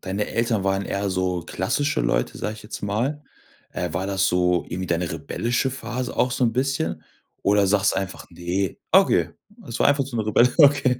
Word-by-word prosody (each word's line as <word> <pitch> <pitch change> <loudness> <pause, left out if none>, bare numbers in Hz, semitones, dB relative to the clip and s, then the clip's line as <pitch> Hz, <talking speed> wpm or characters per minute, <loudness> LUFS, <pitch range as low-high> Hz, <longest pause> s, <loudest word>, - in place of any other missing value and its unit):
deine 100 +2 -2
Eltern 115 -4 0
waren 95 0 +1
eher 100 0 -2
so 90 -1 0
klassische 125 - -1
Leute, - - 0
sage 105 - -3
ich 110 - -12
jetzt 105 - -8
mal. 120 +9 -1 0.5
Äh, - - -3
war 95 +3 -2
das 95 -1 +1
so 90 0 +2
irgendwie 90 +2 -5
deine 85 0 -1
rebellische 120 - -1
Phase 125 -1 -5
auch 125 - +2
so 125 - +1
'n 115 - +2
bisschen? 120 - -1 0.4
Oder 100 0 +3
sagst 100 0 +3
du - - -3
einfach: 95 -1 -4
„Ne“ 90 +2 -2
okay, - - +4 0.4
es 115 - -4
war - - +4
einfach 140 -1 +2
so 130 -2 -6
'ne 110 -2 -1
rebelli 120 +3 +4
okay. 140 -4 +5
100 Hz, 195 wpm, -23 LUFS, 95-125 Hz, 0.5 s, okay